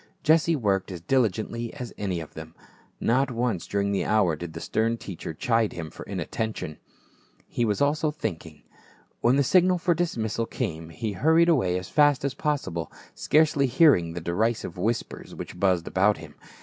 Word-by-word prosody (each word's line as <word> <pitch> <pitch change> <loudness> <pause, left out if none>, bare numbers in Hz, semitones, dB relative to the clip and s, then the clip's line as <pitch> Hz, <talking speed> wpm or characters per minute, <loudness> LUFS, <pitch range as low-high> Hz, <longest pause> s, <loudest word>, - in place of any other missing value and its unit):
Jesse 160 +1 +4
worked 100 -7 0
as 90 - -6
diligently 115 +2 0
as 125 -5 -7
any 95 -4 -2
of 80 - -10
them. 80 0 -10 0.4
Not 130 +4 +2
once 115 -7 -2
during 100 0 0
the 100 - 0
hour 105 -7 +2
did 80 +1 -7
the - - -6
stern 115 +1 0
teacher 95 -7 -7
chide 115 +6 0
him 80 -3 -6
for - - -11
inattention; 110 -9 -4 0.7
he 120 - -1
was 105 +3 +1
also 150 +2 +1
think 110 - -4
ing. 75 -2 -16 0.6
When 120 +3 +3
the 140 - +3
signal 180 +5 +4
for 175 0 +2
dismissal 115 -10 -2
came 80 -9 -4
he 105 +7 -4
hurried 160 - +3
away 95 - +2
as 90 - -6
fast 145 -2 +3
as 140 - -1
possible, 135 - -2 0.2
scarcely 145 -2 +3
hearing 125 - +4
the 85 - -5
derisive 100 +2 -1
whispers 110 +6 -3
which 90 - -8
buzzed 90 -3 +2
about 100 +3 +2
him. - - -11
110 Hz, 175 wpm, -26 LUFS, 90-140 Hz, 0.7 s, Jesse